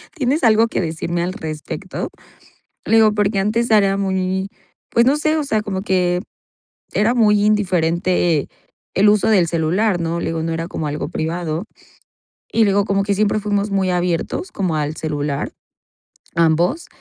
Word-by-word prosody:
"¿Tienes 285 0 0
algo 225 0 +5
que - - -3
decirme 170 +1 -2
al 180 +1 -2
respecto?". 155 -7 -5 0.8
Le 225 - +3
digo 220 -1 +5
porque 205 -1 +1
antes 225 +4 0
era 200 -2 +4
muy, 190 0 -1 0.4
pues, 235 - +3
no 280 +3 +3
sé, 310 +1 +1
o 305 - 0
sea, 220 -6 0
como 190 -2 -3
que 180 -2 +1 0.7
era 220 +4 +2
muy 210 -3 +3
indiferente, 175 -5 +1 0.5
el 205 +2 +5
uso 210 -1 +3
del 190 -6 +4
celular, 175 +4 +1
¿no?, 170 0 -2
le - - -3
digo, 165 -1 -2
no 165 - -2
era 165 +1 -3
como 160 - -4
algo 150 +1 -3
privado. 165 +1 -3 0.9
Y 225 - +4
luego, 200 0 +2
como 195 -1 0
que 200 0 0
siempre 210 +1 +1
fuimos 205 0 -1
muy 195 -1 +1
abiertos 180 - -1
como 185 -5 -1
al 150 +1 -2
celular, 145 -2 -3 0.8
ambos. 170 - +2
190 Hz, 160 wpm, -19 LUFS, 170-210 Hz, 0.9 s, algo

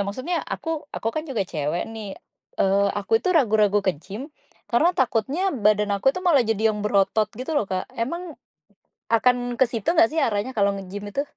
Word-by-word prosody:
maksudnya 255 - -2
aku 320 -3 -4
aku 225 - -2
kan 310 0 -4
juga 220 -7 -1
cewek 155 0 -2
nih, 210 -3 -7 0.4
eee, 200 +1 +3
aku 225 +3 +1
itu - - -2
ragu-ragu 210 -6 +3
ke 185 - +3
gym, 240 - -8 0.4
karena 310 +9 +4
takutnya 270 - 0
badan 210 -3 +2
aku 200 +6 +2
itu 365 +7 0
malah 310 -7 +5
jadi 220 -1 +1
yang 210 - -5
berotot 210 +1 +2
gitu 255 +6 -4
loh, 230 -10 0
Kak. 185 0 -2
Emang, 335 +9 -4 0.7
akan 245 +2 +2
kesitu 240 - +1
nggak 335 -1 +5
sih 320 - -3
arahnya 210 -2 0
kalau 200 -5 +1
nge-gym 195 +1 -7
itu? 280 - +1
225 Hz, 180 wpm, -24 LUFS, 205-275 Hz, 0.7 s, malah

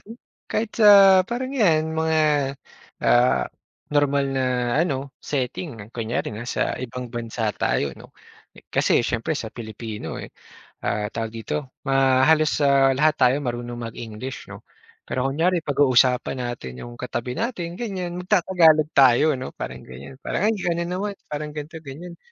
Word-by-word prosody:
'no, 225 +3 -12 0.3
kahit 220 0 -2
sa 195 -2 +8
parang 255 +3 -3
'yan 160 - +2
mga, 160 0 +1 0.8
ah, 120 +1 +4 0.5
normal 140 -1 +2
na 130 -1 0 0.4
ano, 140 -5 -2
setting. 125 - -4
Kunyari 115 -1 -3
nasa 120 +3 -2
ibang 125 -1 -6
bansa 115 -2 -2
tayo 70 -2 -1
'no, - - -16 0.6
kasi 120 - +3
siyempre 120 +7 -1
sa 110 -5 -6
Pilipino, 110 -1 -7
eh, - - -8 0.5
ah, 105 0 -1
tawag 115 0 -4
dito? 130 +5 -5 0.2
Ma 135 -1 +4
halos, 155 -1 +3
ah, 135 -1 +4
lahat 150 +3 +2
tayo 125 +1 +4
marunong 120 -2 -4
mag-English 115 +3 -7
'no. - - -11 0.4
Pero 125 +1 -2
kunyari 170 +5 +1
pag-uusapan 130 -3 +2
natin 115 - -6
yung 120 0 -9
katabi 125 0 -4
natin 180 -8 -3
ganyan, 185 -6 -4
mag 180 - -6
ta-Tagalog 165 -6 +4
tayo 135 +2 +5
'no 130 - -7
parang - - -7
ganyan, 65 - -11
parang, 205 +9 -1
"Ay, 225 - +2
ayan - - -7
ka - - +2
na - - -2
naman. 200 +3 -2 0.2
Parang 150 0 -5
ganito, 155 +2 -7
ganyan." 170 +5 -9
135 Hz, 150 wpm, -23 LUFS, 120-165 Hz, 0.8 s, sa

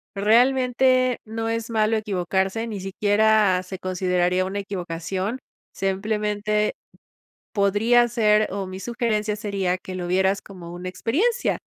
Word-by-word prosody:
Realmente, 255 +3 +3
no 225 +1 -4
es 230 0 -2
malo 220 -1 +2
equivocarse, 195 +1 -1
ni 205 -4 -5
siquiera 205 -1 +2
se 185 0 -8
consideraría 180 0 0
una 195 +2 -3
equivocación, 190 +3 -4 0.3
simplemente 210 +2 -1 0.8
podría 225 +4 +3
ser, 215 -2 +3
o 195 -1 -3
mi 185 +1 -7
sugerencia 220 -3 -1
sería 195 -4 -1
que 185 - -8
lo 180 -1 -4
vieras 190 +2 +2
como 175 -4 -11
una 180 +1 -6
experiencia. 370 - 0
205 Hz, 125 wpm, -23 LUFS, 190-225 Hz, 0.8 s, Realmente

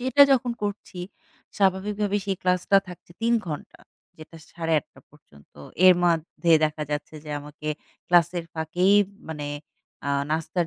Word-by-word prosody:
সেটা 260 +3 +5
যখন 250 -2 +1
করছি, 205 -2 -5 0.6
স্বাভাবিকভাবেই 205 +1 +1
সেই 195 -1 -1
ক্লাসটা 180 +2 +3
থাকছে 180 -1 -12
৩ 235 +1 +3
ঘণ্টা, 150 -3 -7 0.4
যেটা 160 +1 -12 0.2
০৮ঃ৩০ 165 -3 -2
পর্যন্ত। 75 - -21 0.3
এর 185 - +9
মধ্যে 170 0 0
দেখা 155 0 -2
যাচ্ছে 150 +1 -4
যে 150 - -8
আমাকে 150 +1 -8 0.4
ক্লাসের 175 0 +3
ফাঁকেই 175 +5 +2 0.3
মানে 150 -2 -5 0.6
আ - - 0 0.2
নাস্তার 165 +2 -1
175 Hz, 130 wpm, -25 LUFS, 155-195 Hz, 0.6 s, এর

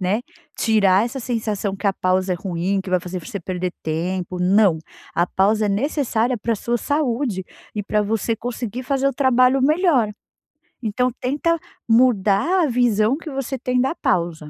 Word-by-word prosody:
né. 195 +5 0 0.3
Tirar 205 -3 +3
essa 255 +3 -4
sensação 215 -5 -2
que 200 - -4
a 200 - +3
pausa 185 0 0
é - - -4
ruim, 185 +2 -1
que 190 - -8
vai 185 - +2
fazer 180 +1 -5
pra 180 - -10
você 200 -6 -5
perder 180 0 -3
tempo, 180 +3 -3
não. 185 -2 +4 0.4
A 175 - +2
pausa 210 +4 +2
é - - -1
necessária 245 +1 0
pra 230 +3 -1
a 225 - -1
sua 240 +4 -1
saúde 250 -9 -1 0.3
e 210 - -2
pra 210 +1 0
você 225 +2 -1
conseguir 240 +1 -5
fazer 275 0 +1
o 275 - -2
trabalho 255 0 +3
melhor. 295 - +3 0.7
Então, 250 +3 0
tenta 295 +6 0 0.3
mudar 235 - +3
a - - +2
visão 240 -1 +2
que 325 0 -8
você 270 -1 -3
tem 250 0 -1
da 265 +6 +1
pausa, 170 - -1
220 Hz, 180 wpm, -21 LUFS, 190-255 Hz, 0.7 s, não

